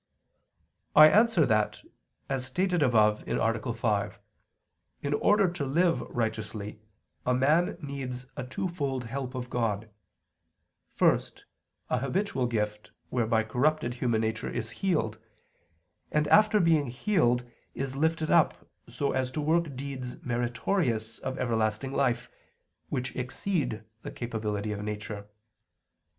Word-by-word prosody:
I 155 +1 +10
answer 215 -4 +5
that, 110 -2 +1 0.4
As 135 -2 -1
stated 180 +5 0
above 110 -5 +4
(A. 60 0 0
5), - - -1 0.8
in 145 0 0
order 205 +5 +4
to 170 -4 -3
live 165 +6 +2
righteously 110 -2 -3 0.4
a 125 - +2
man 150 +8 +3
needs 135 -4 -5
a 140 - -4
twofold 140 -2 -3
help 130 +2 -5
of 125 -1 -5
God 110 -2 -1 1.0
first, - - +1 0.5
a 125 - +2
habitual 135 -1 0
gift 105 -2 -2 0.2
whereby 115 -2 +2
corrupted 125 +3 +1
human 120 -3 0
nature 110 0 -2
is 110 -1 -4
healed, 150 - -1 0.9
and 150 0 +2
after 215 0 +6
being 160 -5 +3
healed 125 - +1 0.3
is 135 -1 -3
lifted 160 +2 +1
up - - +3 0.2
so 140 - -1
as 130 -1 0
to 140 - -4
work 155 -1 +1
deeds 130 -2 -6
meritorious 120 - -1
of 130 0 -4
everlasting 115 0 0
life, 125 -3 +1 0.6
which 130 +1 -3
exceed 125 - -2 0.2
the - - -6
capability 110 -3 -3
of 105 -1 -4
nature. 105 -1 -5
125 Hz, 120 wpm, -29 LUFS, 110-150 Hz, 1.0 s, I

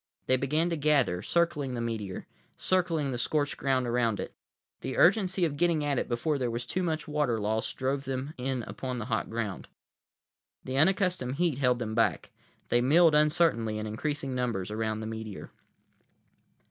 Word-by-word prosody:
They 130 - +3
began 150 +6 0
to - - +1
gather, 140 -11 +2
circling 150 - 0
the - - -3
meteor, 110 -5 -4 0.3
circling 170 -6 +1
the 120 - -3
scorched 145 +3 0
ground 130 -2 0
around 115 -3 +1
it. - - -5 0.5
The 130 - -4
urgency 185 -1 +4
of 145 -3 -3
getting 170 -2 +2
at 145 -3 +1
it - - -3
before 140 +5 0
there 125 -2 0
was 120 +1 -3
too 185 +9 -2
much 160 -3 -2
water 150 -7 0
lost 110 +2 -1
drove 135 +1 -1
them 135 +3 -3
in 130 -1 -2
upon 125 +2 -5
the 115 - -4
hot 110 - -1
ground. 110 -4 -4 1.0
The 130 - -4
unaccustomed 175 -4 +2
heat 165 -4 0
held 125 -3 +3
them 110 -3 -4
back. 115 +1 +1 0.4
They 120 - +3
milled 160 +5 +5
uncertainly, 150 -8 +3
in 110 - -3
increasing 135 +5 -3
numbers, 115 -7 -2
around 110 0 -2
the - - -5
meteor. 110 -2 -6
130 Hz, 170 wpm, -29 LUFS, 115-150 Hz, 1.0 s, milled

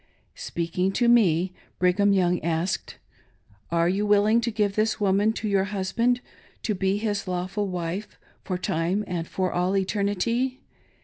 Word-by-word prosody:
Speaking 175 +3 -2
to 240 - +2
me, 185 -7 +4 0.2
Brigham 185 +3 +3
Young 180 -3 +2
asked: 170 +2 -2 0.7
"Are 170 0 +2
you 195 +4 +1
willing 210 +2 +4
to 235 - -1
give 210 -3 0
this 215 +1 +1
woman 205 +1 +3
to 220 - -4
your 195 -2 +2
husband 220 +5 0 0.4
to 215 - 0
be 195 0 0
his 205 -2 -2
lawful 185 +3 -2
wife 180 +2 -4 0.3
for 185 - -2
time 180 +3 -1
and 170 -2 -3
for 185 -1 -2
all 180 +2 +1
eternity 210 +6 0
195 Hz, 145 wpm, -25 LUFS, 180-210 Hz, 0.7 s, me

